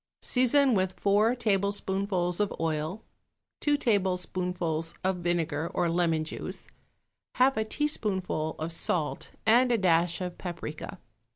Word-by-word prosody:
Season 260 +1 +4
with 185 -2 0
four 210 +4 +3
tablespoonfuls 195 -4 0
of 205 -1 +1
oil, 160 +5 -2 0.6
two 295 -1 +2
tablespoonfuls 180 - -1
of 190 0 +1
vinegar 170 -3 -1
or 170 - +1
lemon 165 -2 +1
juice, 155 - -6 0.7
half 260 +2 +4
a 220 - +1
teaspoonful 200 - -1
of 160 +2 -4
salt 165 -2 -1
and 245 +3 +5
a 235 - +3
dash 170 -3 +2
of 180 -1 -5
paprica. 175 0 -6
185 Hz, 120 wpm, -28 LUFS, 170-215 Hz, 0.7 s, and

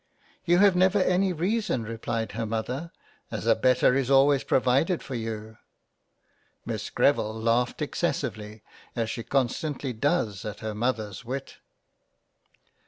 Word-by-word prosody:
" - - -33
You 175 0 +4
have 195 -1 +5
never 185 +2 +4
any 185 0 +2
reason 185 - -1
replied 115 0 -3
her 115 -1 -3
Mother, 125 +9 -3 0.4
as - - -5
a - - +5
better 125 -1 +3
is 135 -1 0
always 140 0 +5
provided 135 +8 +2
for 135 - -7
you." 110 -2 -5 1.1
Miss - - -4
Greville 110 +1 +1
laughed 120 +5 +1
excessively, 110 - -3 0.3
as 115 -1 -1
she 115 - -4
con 135 +2 +1
stantly 140 0 -4
does 115 - 0
at 105 -2 -6
her 110 -1 -3
Mother's 110 -2 -2
wit. 130 +3 -6
125 Hz, 140 wpm, -26 LUFS, 110-155 Hz, 1.1 s, have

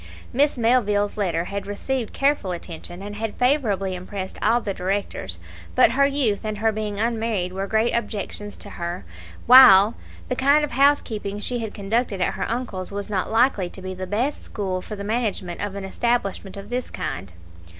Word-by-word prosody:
Miss 280 +2 +2
Melville's 210 -4 +2
letter 175 -5 0
had 200 +1 -5
received 230 +3 -3
careful 275 -9 +1
attention, 175 +1 -7
and 205 0 -6
had 225 -1 -3
favourably 230 -8 +1
impressed 185 +1 -6
all 235 - +3
the 205 -4 -3
directors; 185 - -3 0.4
but - - +6
her 275 +3 +4
youth 265 -8 0
and 215 -1 -3
her 220 +1 +2
being 210 -1 -3
unmarried 220 -5 -1
were 195 +1 -3
great 220 +3 +1
objections 205 -2 -3
to - - -9
her, 170 - -5 0.4
while 235 -5 +9 0.3
the 250 - -1
kind 280 +4 +4
of 295 - -2
housekeeping 230 -7 +2
she 245 +3 -2
had 220 -2 -5
conducted 205 0 -1
at 180 - +1
her - - -3
uncle's 225 -7 -3
was 200 +1 -5
not 190 -2 -1
likely 225 -5 +3
to 190 - -10
be 185 0 -4
the 185 0 -6
best 240 +9 -1
school 190 -3 -3
for 210 - -7
the 200 - -6
management 205 -5 -2
of 205 -1 -3
an 200 - -5
establishment 200 -2 -1
of 200 +3 -9
this 250 0 -2
kind. 90 0 -5
205 Hz, 180 wpm, -23 LUFS, 195-240 Hz, 0.4 s, while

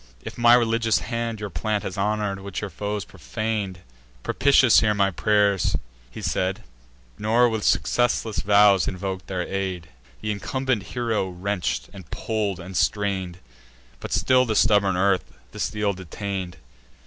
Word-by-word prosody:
If - - -7
my 120 0 +6
religious 115 -1 +2
hand 115 -2 -3
Your 105 -2 -5
plant 100 +7 -1
has 95 - -5
honour'd, 105 0 -1
which 100 -1 -5
your 105 -2 -5
foes 105 +2 -4
profan'd, 100 - -4 0.4
Propitious 135 -4 +5
hear 105 -1 +2
my 100 -1 +2
pious 100 -1 +2
pray'r!" - - 0 0.3
He - - -9
said, 95 +4 -1 0.6
Nor 115 +3 +3
with 110 -2 -2
successless 115 -6 +1
vows 100 +1 +5
invok'd 95 0 -4
their 90 -2 -2
aid. 95 -3 -4 0.3
Th' - - -8
incumbent 120 +3 -1 0.2
hero 115 -5 0
wrench'd, 95 +1 -3
and 95 -5 -12
pull'd, 105 -4 -2
and 95 +2 -9
strain'd; 95 -4 0 0.6
But - - -7
still 130 0 +3
the 110 -3 -1
stubborn 100 -4 +3
earth 95 0 +1 0.2
the - - -10
steel 105 -1 0
detain'd. 95 0 -5
100 Hz, 150 wpm, -24 LUFS, 95-110 Hz, 0.6 s, my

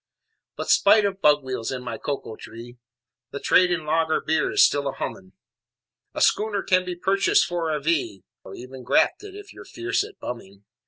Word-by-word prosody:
But - - -2
spite 215 -2 +5
of 195 -1 -3
bug 150 -1 +4
wheels 130 -3 -4
in 130 -1 -5
my 115 -3 -6
cocoa 140 -6 -5
tree, 120 +3 -12 0.5
The 140 - -6
trade 180 +4 +4
in 175 -3 -2
lager 160 +1 +1
beer 160 - 0
is 400 +1 +5
still 140 -1 0
a 135 - -2
humming, 95 -1 -7 0.8
A - - -3
schooner 205 -1 +1
can 185 0 +2
be 180 -1 -4
purchased 195 +3 +2
for 170 -2 -3
a 150 - -1
V 145 - -1 0.2
Or 95 - -10
even 130 +1 -10
grafted 395 - 0
if 410 0 -11
you're - - -12
fierce 385 +3 -2
at 425 -1 -12
bumming. 100 -5 -8
155 Hz, 190 wpm, -24 LUFS, 125-195 Hz, 0.8 s, spite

